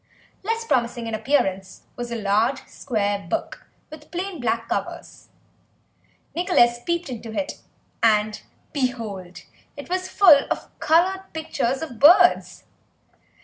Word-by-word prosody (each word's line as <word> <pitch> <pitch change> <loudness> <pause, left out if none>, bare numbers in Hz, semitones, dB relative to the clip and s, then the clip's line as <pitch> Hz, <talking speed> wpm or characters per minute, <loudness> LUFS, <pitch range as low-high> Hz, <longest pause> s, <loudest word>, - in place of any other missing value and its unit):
Less 455 +3 -2
promising 240 - 0
in 225 - -5
appearance 195 -7 -1
was 240 -1 -6
a - - -2
large 225 +5 0
square 205 -6 -2
book - - -4 0.2
with 305 -1 -12
plain 360 0 -5
black 230 -1 -1
covers; - - -5 1.1
Nicholas 240 -10 +3
peeped 340 0 -1
into 235 -3 -7
it, 290 - -5 0.4
and, 215 -1 +2 0.3
behold, 225 -10 -4 0.3
it 285 - -9
was 370 0 -2
full 330 -8 +6
of - - -3
coloured 370 +4 +2
pictures 280 -3 -2
of 245 -8 -8
birds. 355 +5 +5
260 Hz, 120 wpm, -23 LUFS, 225-340 Hz, 1.1 s, full